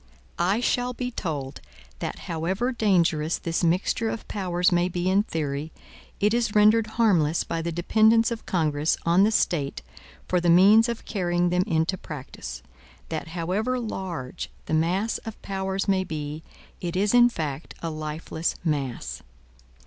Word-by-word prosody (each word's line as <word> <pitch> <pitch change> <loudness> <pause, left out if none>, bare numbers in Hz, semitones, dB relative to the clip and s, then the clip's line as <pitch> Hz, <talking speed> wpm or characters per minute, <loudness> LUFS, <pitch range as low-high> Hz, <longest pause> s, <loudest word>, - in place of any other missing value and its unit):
I 190 +7 +2
shall 245 0 0
be 250 0 -4
told, 150 - -4 0.4
that - - -4
however 185 +9 -1
dangerous 175 -8 +2
this 165 +1 -2
mixture 185 +6 +1
of 230 - -5
powers 180 -3 +1
may 175 +1 +2
be 175 0 -2
in 195 +2 +4
theory, 155 -5 -3 0.5
it 210 +2 +3
is 235 -3 0
rendered 215 +1 +5
harmless 170 -9 +3
by 165 - -3
the 170 +1 -2
dependence 220 +7 +3
of 230 - -5
Congress 155 -3 +1
on 170 +3 +4
the 220 - +2
State 150 - 0 0.4
for 180 -1 +1
the 175 - +2
means 205 +7 +7
of 235 - -4
carrying 175 -3 0
them 180 +1 +2
into 165 +3 0
practice; 130 - -8 0.5
that 160 0 -4
however 205 +9 0
large 185 - -5 0.2
the - - -4
mass 180 +8 +1
of 225 -2 -9
powers 190 0 -2
may 190 -1 +2
be, 150 -2 -5 0.4
it 175 -1 -4
is 200 +4 +2
in 245 0 +7
fact 155 - -5
a 165 - -2
lifeless 155 +1 -3
mass. 140 -7 -2
175 Hz, 155 wpm, -25 LUFS, 160-210 Hz, 0.5 s, means